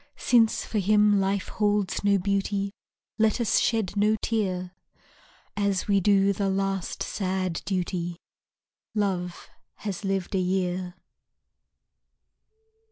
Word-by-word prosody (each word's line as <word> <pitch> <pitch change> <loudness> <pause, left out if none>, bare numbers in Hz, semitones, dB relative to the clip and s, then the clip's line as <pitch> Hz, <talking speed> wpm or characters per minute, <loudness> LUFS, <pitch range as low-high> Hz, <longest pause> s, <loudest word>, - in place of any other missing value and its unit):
Since 230 -3 +3
for 215 - -1
him 210 +1 +4
life 195 0 0
holds 205 -3 0
no 200 -1 +4
beauty 200 +1 -1 0.5
Let 220 +2 +3
us 235 -4 +3
shed 220 -5 0
no 210 +1 +3
tear, 185 -5 -1 0.8
As 200 -2 0
we 200 -1 +3
do 200 0 +3
the 195 0 -1
last 195 -1 -1
sad 185 -3 -2
duty 175 -2 -2 0.8
Love 180 -4 -2 0.3
has 205 -2 -5
lived 195 -1 -2
a 190 - +2
year. 180 -1 -1
195 Hz, 110 wpm, -26 LUFS, 185-205 Hz, 0.8 s, him